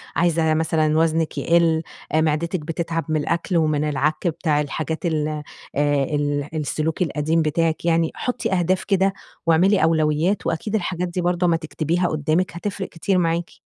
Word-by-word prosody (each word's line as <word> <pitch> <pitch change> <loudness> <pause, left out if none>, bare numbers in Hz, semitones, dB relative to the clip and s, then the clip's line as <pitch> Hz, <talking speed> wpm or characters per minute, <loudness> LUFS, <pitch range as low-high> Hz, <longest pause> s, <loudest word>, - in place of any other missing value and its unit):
عايزة 165 -2 +2
مثلًا 155 -1 +1
وزنِك 160 0 +1
يقل، 165 -1 +3 0.3
آآ 155 - +3
معدتِك 160 +3 0
بتتعب 165 +1 -3
من 155 -1 +1
الأكل 170 +3 -1
ومن 155 -2 +1
العك 150 +3 0
بتاع 155 -2 +1
الحاجات 160 +4 -3
ال 155 -3 0
آآ 150 -1 -4 0.6
ال 145 0 -1
السلوك 155 +2 -2
القديم 160 0 +1
بتاعِك 160 +1 0
يعني. 165 -1 +2
حطي 250 -4 -2
أهداف 185 +1 +1
كده 195 -1 +2 0.3
واعملي 175 +3 +4
أولويات، 160 +4 +1
وأكيد 185 +6 -2
الحاجات 180 -3 -1
دي 175 +1 -3
برضو 175 +1 +1
أما 165 -1 +3
تكتبيها 165 +2 -1
قدامِك 155 +4 0
هتفرِق 195 +2 -4
كتير 185 +3 -1
معاكِ. 170 -1 0
165 Hz, 155 wpm, -22 LUFS, 155-175 Hz, 0.6 s, واعملي